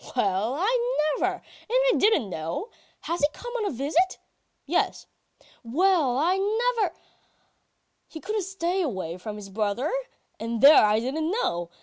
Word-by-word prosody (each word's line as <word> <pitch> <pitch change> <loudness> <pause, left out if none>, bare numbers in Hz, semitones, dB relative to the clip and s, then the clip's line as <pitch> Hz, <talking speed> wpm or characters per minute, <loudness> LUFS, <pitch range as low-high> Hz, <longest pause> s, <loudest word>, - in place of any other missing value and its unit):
"'Well, 210 +1 0
I 475 +8 +1 0.3
never! - - +2
And - - -16 0.3
I - - +3
didn't 400 - +2
know! 165 - -4 0.3
Has 340 +1 -3
he 290 - +5
come 485 0 -8
on 440 - -2
a - - 0
visit? 300 +8 0 0.5
"Yes." - - 0 0.6
"Well, 290 0 +2
I 345 +7 +2
never.... 445 +3 0 1.1
He 320 - -9
couldn't 425 +5 -2
stay 375 0 -2
away 190 - -3
from 210 +3 -6
his 200 -2 -10
brother.... 215 +6 -1 0.5
And 230 0 -3
there 285 +5 +8
I 210 +1 +3
didn't 300 +7 -2
know! 175 - -1
310 Hz, 145 wpm, -26 LUFS, -, 1.1 s, there